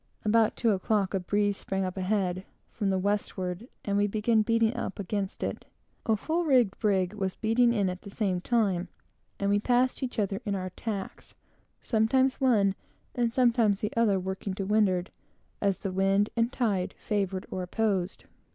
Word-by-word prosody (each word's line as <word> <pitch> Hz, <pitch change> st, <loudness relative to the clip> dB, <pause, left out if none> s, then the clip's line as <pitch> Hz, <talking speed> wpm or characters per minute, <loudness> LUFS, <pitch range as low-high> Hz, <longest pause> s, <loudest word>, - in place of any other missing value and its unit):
About 220 Hz, +1 st, +3 dB
two 230 Hz, -, +2 dB
o'clock 200 Hz, 0 st, 0 dB
a 195 Hz, -, +1 dB
breeze 205 Hz, +2 st, 0 dB
sprang 195 Hz, 0 st, -2 dB
up 185 Hz, -, -4 dB
ahead, 185 Hz, -1 st, -1 dB, 0.3 s
from 205 Hz, -3 st, -1 dB
the 190 Hz, -, +1 dB
westward, 190 Hz, 0 st, -2 dB, 0.2 s
and 200 Hz, -1 st, 0 dB
we 205 Hz, -, +3 dB
began 215 Hz, +2 st, +2 dB
beating 230 Hz, +1 st, +2 dB
up -, -, -4 dB
against 200 Hz, 0 st, -3 dB
it. -, -, -3 dB, 0.4 s
A 220 Hz, -, +4 dB
full 325 Hz, +10 st, -1 dB
rigged 250 Hz, -, +3 dB
brig 190 Hz, -3 st, +1 dB
was 190 Hz, -3 st, -2 dB
beating 235 Hz, +2 st, +3 dB
in 205 Hz, -5 st, +1 dB
at 180 Hz, 0 st, -4 dB
the 200 Hz, -, -10 dB
same 195 Hz, -3 st, -1 dB
time, 195 Hz, -6 st, +1 dB, 0.5 s
and 200 Hz, 0 st, +1 dB
we 205 Hz, -, +3 dB
passed 250 Hz, +5 st, +1 dB
one 260 Hz, -, -1 dB
another, 200 Hz, 0 st, -1 dB
in 205 Hz, -3 st, -1 dB
our 185 Hz, -1 st, -4 dB
tacks, 200 Hz, -1 st, -6 dB, 0.5 s
sometimes 260 Hz, +5 st, +2 dB
one 210 Hz, -7 st, +4 dB, 0.4 s
and 240 Hz, -2 st, 0 dB
sometimes 230 Hz, -5 st, +3 dB
the 210 Hz, -, -2 dB
other, 215 Hz, -4 st, +3 dB
working 190 Hz, +1 st, -4 dB
to 195 Hz, -, -3 dB
windward, 195 Hz, -3 st, +2 dB, 0.5 s
as 200 Hz, -2 st, +1 dB
the 195 Hz, -, -4 dB
wind 195 Hz, +2 st, +2 dB
and 230 Hz, +1 st, +1 dB
tide 205 Hz, -9 st, -1 dB
favored 195 Hz, -3 st, -2 dB
or 185 Hz, -, -3 dB
opposed. 190 Hz, -1 st, -1 dB
205 Hz, 175 wpm, -28 LUFS, 190-225 Hz, 0.5 s, A